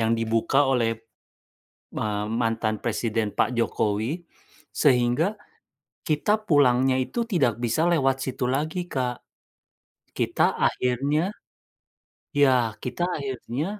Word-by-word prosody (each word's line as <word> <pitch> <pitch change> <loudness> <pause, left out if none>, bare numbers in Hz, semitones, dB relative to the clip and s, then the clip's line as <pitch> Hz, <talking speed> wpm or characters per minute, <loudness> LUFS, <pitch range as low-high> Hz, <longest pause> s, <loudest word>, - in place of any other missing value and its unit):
yang 115 +1 +2
dibuka 115 +3 +1
oleh, 115 -3 +2 1.0
eee, 105 -1 -2 0.2
mantan 115 -2 -1
Presiden 110 -2 -1
Pak 125 - +2
Jokowi 115 - -1 0.5
sehingga 125 +2 +3 0.8
kita 155 +6 +2
pulangnya 130 -3 +4
itu 130 - -2
tidak 135 - +1
bisa 120 +8 +1
lewat 135 -5 +2
situ 130 -1 -3
lagi, 155 +6 -1
Kak. 125 -2 -2 1.0
Kita - - +1
akhirnya 140 +9 0 1.0
ya, 130 -6 +3
kita 125 +7 -4
akhirnya, 135 +1 -4
125 Hz, 100 wpm, -25 LUFS, 115-145 Hz, 1.0 s, pulangnya